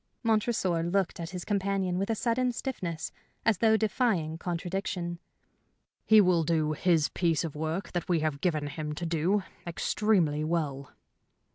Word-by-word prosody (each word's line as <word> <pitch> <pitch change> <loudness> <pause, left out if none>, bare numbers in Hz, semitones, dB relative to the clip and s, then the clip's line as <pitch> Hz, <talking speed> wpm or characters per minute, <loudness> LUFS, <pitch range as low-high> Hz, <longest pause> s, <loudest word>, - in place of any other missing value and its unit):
Montresor 215 -6 +1
looked 175 +2 0
at 165 -1 -4
his 180 -1 -6
companion 195 -3 0
with 195 - -1
a 225 - +1
sudden 245 +3 +1
stiffness, 180 -11 -4 0.3
as 220 -5 +3
though 220 -1 +5
defying 195 -8 0
contradiction. 175 0 -3 0.9
"He 220 -1 +8
will 180 -4 +4
do 155 -1 +1
this 165 -5 +4
piece 165 -3 +1
of 160 -3 -5
work 160 +5 -3
that 175 +1 -3
we 170 -3 +2
have 155 -2 -1
given 155 -5 0
him 150 +1 -4
to 170 - -4
do 170 +5 +1 0.2
extremely 170 -4 +1
well." 150 -4 -2
175 Hz, 150 wpm, -29 LUFS, 160-200 Hz, 0.9 s, He